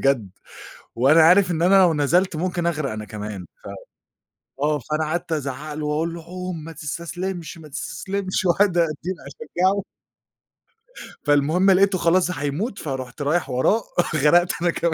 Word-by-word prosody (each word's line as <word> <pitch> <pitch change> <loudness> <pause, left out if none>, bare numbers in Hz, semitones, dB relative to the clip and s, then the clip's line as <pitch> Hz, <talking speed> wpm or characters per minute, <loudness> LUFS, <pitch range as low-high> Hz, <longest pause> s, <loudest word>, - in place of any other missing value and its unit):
بجد، 130 -8 +1 0.6
وأنا 140 +7 +5
عارف 180 +3 +6
إن 165 -1 -1
أنا 185 +3 +4
لو 175 -3 +4
نزلت 165 +5 +2
ممكن 175 +1 -2
اغرق 155 -5 -1
أنا 110 0 -5
كمان، 105 -2 -7 0.2
ف - - -8 0.9
آه، 150 0 +1
فأنا 155 +5 -2
قعدت 170 +3 -3
ازعق 150 0 -3
له 150 0 -4
واقول 155 +3 -1
له: 170 -1 -8
"عوم 180 -1 -6
ما 165 - -8
تستسلمش، 170 +3 -5
ما 160 -2 -12
تستسلمش." 190 +6 -3
وقاعد 180 +1 +3
اديل 170 +2 -1
أشجعه. 195 - -1 1.4
فالمهم 155 +7 +3
لقيته 195 +1 +4
خلاص 180 +1 +2
هيموت، 155 - -3
فرُحت 130 -1 -5
رايح 145 +1 0
وراه 135 - +2 0.3
غرقت 170 +5 +4
أنا 175 - +2
كمان 170 0 -1
165 Hz, 150 wpm, -22 LUFS, 145-180 Hz, 1.4 s, عارف